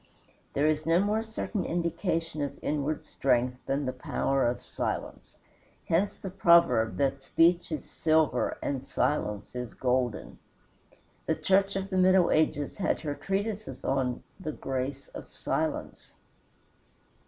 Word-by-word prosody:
There 140 Hz, -, +2 dB
is 155 Hz, 0 st, +1 dB
no 165 Hz, +1 st, +4 dB
more 210 Hz, +3 st, +1 dB
certain 220 Hz, -2 st, -3 dB
indication 165 Hz, -2 st, -1 dB
of 145 Hz, -, -3 dB
inward 150 Hz, 0 st, -1 dB
strength 125 Hz, -1 st, 0 dB
than 140 Hz, +1 st, 0 dB
the 130 Hz, -, -2 dB
power 135 Hz, +1 st, 0 dB
of 120 Hz, -, -2 dB
silence. -, -, -4 dB, 0.5 s
Hence 185 Hz, +5 st, +1 dB
the 190 Hz, -, -7 dB
proverb 170 Hz, -11 st, +4 dB
that 135 Hz, -1 st, 0 dB
speech 170 Hz, +5 st, +3 dB
is 155 Hz, -, -3 dB
silver 155 Hz, -6 st, +1 dB
and 135 Hz, -2 st, -1 dB
silence 105 Hz, -6 st, -1 dB
is 125 Hz, -1 st, -5 dB
golden. 125 Hz, -2 st, -1 dB, 0.9 s
The -, -, +2 dB
Church 195 Hz, +1 st, +2 dB
of 195 Hz, +1 st, -3 dB
the 190 Hz, -, 0 dB
middle 185 Hz, -1 st, +5 dB
ages 155 Hz, -2 st, +1 dB
had 195 Hz, -, 0 dB
her 150 Hz, -3 st, -2 dB
treatises 205 Hz, +6 st, -3 dB
on 130 Hz, -2 st, 0 dB, 0.2 s
"The 155 Hz, -5 st, -4 dB
Grace 135 Hz, +1 st, -4 dB
of -, -, -10 dB
Silence." -, -, -3 dB
155 Hz, 135 wpm, -29 LUFS, 135-180 Hz, 0.9 s, middle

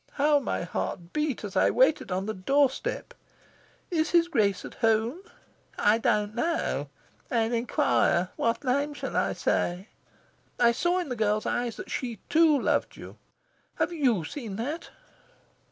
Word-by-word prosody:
How 295 Hz, +1 st, +3 dB
my 265 Hz, -, -2 dB
heart 175 Hz, 0 st, -4 dB
beat 300 Hz, -6 st, -1 dB
as 205 Hz, -, -6 dB
I -, -, +4 dB
waited 315 Hz, -, +2 dB
on 185 Hz, +1 st, -1 dB
the 220 Hz, -, -2 dB
doorstep! 275 Hz, -, 0 dB, 0.8 s
'Is 320 Hz, -2 st, +1 dB
his 340 Hz, -1 st, +4 dB
Grace 205 Hz, -, +1 dB
at -, -, -9 dB
home?' 225 Hz, +7 st, +1 dB, 0.6 s
'I 210 Hz, +2 st, +4 dB
don't 210 Hz, -4 st, +1 dB
know. 235 Hz, -, -1 dB, 0.4 s
I'll 230 Hz, -1 st, +1 dB
inquire. 230 Hz, -, +2 dB
What 230 Hz, +3 st, 0 dB
name 280 Hz, +3 st, 0 dB
shall -, -, -5 dB
I -, -, +1 dB
say?' 180 Hz, +5 st, -1 dB, 0.7 s
I 235 Hz, -1 st, +5 dB
saw 345 Hz, +9 st, +1 dB
in 360 Hz, -5 st, -2 dB
the 250 Hz, -, -2 dB
girl's 215 Hz, -1 st, 0 dB
eyes 240 Hz, -2 st, -1 dB
that -, -, -9 dB
she, 240 Hz, -4 st, -3 dB
too, 315 Hz, -2 st, +5 dB
loved -, -, 0 dB
you. -, -, -11 dB, 0.6 s
Have -, -, -1 dB
YOU 250 Hz, -, +1 dB
seen 225 Hz, -, -6 dB
that?" 285 Hz, +10 st, -4 dB
240 Hz, 155 wpm, -27 LUFS, 215-295 Hz, 0.8 s, I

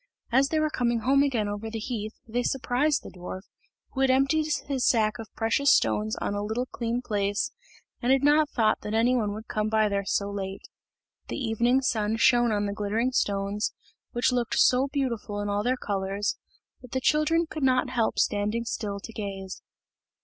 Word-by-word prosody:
As 270 Hz, +3 st, +4 dB
they 315 Hz, -, +1 dB
were 310 Hz, 0 st, +1 dB
coming 240 Hz, -3 st, 0 dB
home 275 Hz, +4 st, +4 dB
again 245 Hz, -7 st, +1 dB
over 205 Hz, +2 st, -4 dB
the 225 Hz, -, -5 dB
heath, 220 Hz, -1 st, -4 dB
they 240 Hz, +2 st, -1 dB
surprised 265 Hz, +4 st, 0 dB
the -, -, -9 dB
dwarf, 185 Hz, +1 st, -7 dB, 0.5 s
who 270 Hz, -, -3 dB
had 270 Hz, -, +4 dB
emptied 275 Hz, +4 st, +3 dB, 0.2 s
his 270 Hz, -3 st, -1 dB
sack 220 Hz, -1 st, +2 dB
of 225 Hz, -, -8 dB
precious 235 Hz, +5 st, +3 dB
stones 110 Hz, -1 st, +1 dB
on -, -, -3 dB
a 205 Hz, -, -2 dB
little 220 Hz, +4 st, -2 dB
clean 240 Hz, 0 st, -3 dB
place, 205 Hz, -2 st, -1 dB, 0.5 s
and 245 Hz, +1 st, +2 dB
had 270 Hz, 0 st, +3 dB
not 295 Hz, +1 st, +4 dB
thought 220 Hz, -5 st, +1 dB
that 210 Hz, +1 st, -3 dB
any 240 Hz, +3 st, +3 dB
one 215 Hz, -4 st, 0 dB
would 220 Hz, +2 st, -8 dB
come 215 Hz, 0 st, -1 dB
by 220 Hz, -1 st, +3 dB
there 200 Hz, 0 st, -1 dB
so 200 Hz, +1 st, -1 dB
late. 195 Hz, -1 st, -5 dB, 0.6 s
The -, -, -4 dB
evening 240 Hz, 0 st, +2 dB
sun 220 Hz, -3 st, 0 dB
shone 240 Hz, 0 st, +4 dB
on 205 Hz, -1 st, 0 dB
the 200 Hz, -, -2 dB
glittering 215 Hz, +5 st, -1 dB
stones, 200 Hz, -2 st, -1 dB, 0.4 s
which 240 Hz, +1 st, +1 dB
looked 245 Hz, -2 st, 0 dB
so 255 Hz, +2 st, +4 dB
beautiful 245 Hz, -7 st, -2 dB
in 205 Hz, 0 st, -2 dB
all 205 Hz, 0 st, 0 dB
their 250 Hz, +4 st, 0 dB
colours, 200 Hz, -1 st, -2 dB, 0.5 s
that 250 Hz, -2 st, -13 dB
the 260 Hz, -, +1 dB
children 305 Hz, +5 st, +2 dB
could 310 Hz, -, -6 dB
not 255 Hz, -1 st, +2 dB
help 235 Hz, -3 st, 0 dB
standing 210 Hz, +3 st, 0 dB
still 205 Hz, -3 st, -3 dB
to 225 Hz, -, -10 dB
gaze. 195 Hz, -3 st, -6 dB
225 Hz, 195 wpm, -27 LUFS, 205-255 Hz, 0.6 s, As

